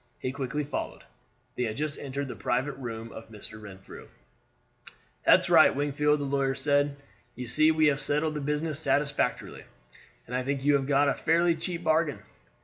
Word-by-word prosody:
He 130 - -3
quickly 140 +2 -3
followed. 145 - -5 0.5
They 125 - -1
had 110 -1 -4
just 150 0 -3
entered 140 0 -4
the - - -6
private 130 +4 -1
room 115 -3 -6
of 110 - -10
Mr. 110 0 -10
Renfrew. 95 -2 -11 1.2
"That's - - +6
right, - - +6
Wingfield," 145 +1 +1
the - - -2
lawyer 135 -1 0
said. 145 +1 +1 0.4
"You 125 0 -6
see 155 +7 +4
we 155 -1 +3
have 145 -1 +2
settled 150 +2 0
the 150 - -4
business 150 +1 -2
satisfactorily, 145 -1 -1 0.6
and 125 - -6
I 130 - 0
think 135 +1 -2
you 145 +1 +4
have 135 -1 +1
got 145 0 +3
a 140 - +3
fairly 170 +1 +2
cheap 170 +1 -4
bargain. 160 -2 +1
140 Hz, 175 wpm, -28 LUFS, 130-150 Hz, 1.2 s, That's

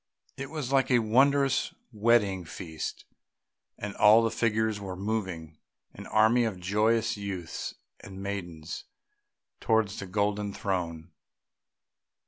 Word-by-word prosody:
It 135 0 -6
was 150 -4 -4
like 135 -2 +3
a 125 - +5
wondrous 135 +4 +3 0.2
wedding 105 -4 +3
feast, 80 -1 -6 0.7
and 100 0 -5
all 110 +2 +7
the 115 - +1
figures 110 -2 0
were 95 -2 -6
moving, 95 -6 -4 0.3
an - - -10
army 110 +3 +4
of 110 -5 -2
joyous 110 +5 +1
youths 95 -5 -5 0.2
and 95 0 -10
maidens, 85 -5 -5 0.7
towards 110 -3 +1
a 95 - -6
golden 105 +1 -1
throne. 85 -3 -3
105 Hz, 115 wpm, -28 LUFS, 95-115 Hz, 0.7 s, all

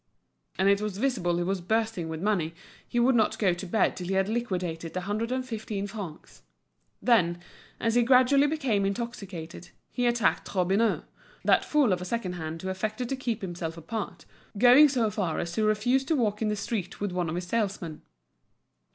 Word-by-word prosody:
And 190 - +2
it 200 +1 +4
was 210 -2 -3
visible 210 -9 0
he 175 - 0
was 190 +1 -1
bursting 220 -3 -1
with 160 +2 -5
money, 175 -6 0 0.3
he 240 - -1
would 250 +2 +4
not 220 -3 +2
go 190 -4 +2
to 175 +2 -6
bed 215 +5 +2
till 180 - -6
he 190 - 0
had 190 0 +2
liquidated 180 -8 -3
the 185 - -1
hundred 215 +5 -2
and 255 0 -1
fifteen 215 -4 -4
francs. 195 -6 -8 0.6
Then, 175 -8 +3 0.4
as 230 -1 +1
he 245 - +4
gradually 260 +3 +5
became 270 -10 0
intoxicated, 195 -6 -5 0.2
he 245 -1 0
attacked 235 -4 +1
Robineau, 195 +5 +2 0.4
that - - +4
fool 285 -9 +3
of 180 - -2
a - - -4
second 190 -2 -2
hand 160 -1 -6
who 190 - -2
affected 215 +6 -3
to 270 - 0
keep 235 -4 -3
himself 170 -3 -4
apart, 205 +6 -5 0.3
going 255 +7 +8
so 235 -6 +1
far 185 -5 -1
as 170 - -2
to 215 +5 0
refuse 225 +5 +2
to 320 - +1
walk 215 -5 0
in 220 - +1
the 210 - 0
street 200 -3 -4
with 205 -2 -2
one 180 -2 -1
of 160 - -3
his 175 0 -3
salesmen. 190 -6 -2
205 Hz, 195 wpm, -28 LUFS, 180-235 Hz, 0.6 s, going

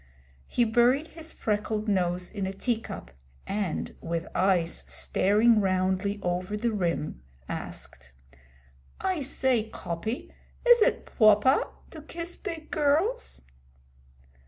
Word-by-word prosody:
He 240 - +2
buried 240 +7 +3
his 325 0 -7
freckled 215 0 -1
nose 180 -3 0
in 200 -3 -3
a 190 - -3
tea 230 +3 -1
cup - - -8 0.3
and, 200 -4 -2
with 165 +1 -2
eyes 180 -3 +1
staring 215 +4 +3
roundly 190 +1 +1
over 180 +3 -1
the 235 +2 0
rim, 170 - -1 0.3
asked: 65 - -7 0.9
'I 375 -5 0
say, 260 -4 +1
Coppy, 215 +6 -4 0.4
is 485 -1 +8
it - - +3
pwoper 215 +4 +4 0.2
to 315 - -9
kiss 335 +3 -5
big 320 -2 -7
girls?' 325 +12 +1
215 Hz, 115 wpm, -28 LUFS, 185-280 Hz, 0.9 s, is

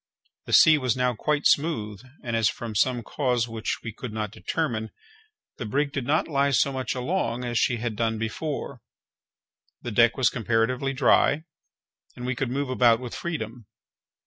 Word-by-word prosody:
The - - -4
sea 155 -1 +7
was 130 -2 0
now 125 0 +1
quite 150 +6 -1
smooth, 110 - +1 0.2
and 120 -3 -2
as, 110 -2 +3
from 115 -2 -6
some 120 +3 +1
cause 125 -4 0
which 115 -1 -3
we 115 - -5
could 120 +1 -7
not 105 -2 -3
determine, 115 -6 -2 0.7
the - - -5
brig 140 +5 0
did 135 -3 -4
not 155 +3 +2
lie 140 -2 +1
so 140 +1 +2
much 130 0 -3
along 125 -2 -1
as 120 -1 0
she 120 - +2
had 115 -1 -3
done 115 0 0
before, 125 +3 -4 1.0
the 120 - -4
deck 115 +3 +4
was 130 -4 +3
comparatively 120 +4 0
dry, 140 +3 +3 0.7
and 125 - -7
we 130 - 0
could 125 0 -2
move 135 +1 -2
about 120 -3 +4
with 125 -2 -7
freedom. 120 -9 -5
125 Hz, 170 wpm, -25 LUFS, 115-140 Hz, 1.0 s, sea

